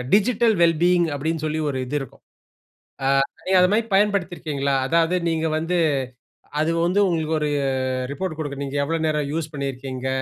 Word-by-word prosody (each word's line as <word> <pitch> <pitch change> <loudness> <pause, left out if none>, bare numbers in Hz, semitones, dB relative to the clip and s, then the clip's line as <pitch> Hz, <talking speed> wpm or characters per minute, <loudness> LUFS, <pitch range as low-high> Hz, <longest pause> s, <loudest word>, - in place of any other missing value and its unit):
Digital 225 +1 +3
well 165 -2 +4
being 175 -1 +4
அப்படின்னு 160 +2 -2
சொல்லி 155 +1 -1
ஒரு 130 - -3
இது 145 +4 -2
இருக்கும். 135 - -10 0.8
ஆ - - +1 0.4
நீங்க 190 0 +3
அது 180 +1 +4
மாரி 220 +2 +2
பயன்படுத்தி 195 -3 +2
இருக்கீங்களா? 140 -3 -1
அதாவது 165 +4 +2 0.2
நீங்க 160 0 0
வந்து 175 +3 -1 0.8
அது 160 +2 +1
வந்து 185 +4 +2
உங்களுக்கு 160 -2 0
ஒரு 150 - 0 0.6
ரிப்போர்ட் 185 -2 -4
குடுக்கும். 140 -2 -4
நீங்க 140 +1 -4
எவ்வளோ 165 +2 -1
நேரம் 150 -2 -1
யூஸ் 160 -1 -3
பண்ணியிருக்கீங்க? 130 -2 -4
160 Hz, 165 wpm, -23 LUFS, 145-180 Hz, 0.8 s, well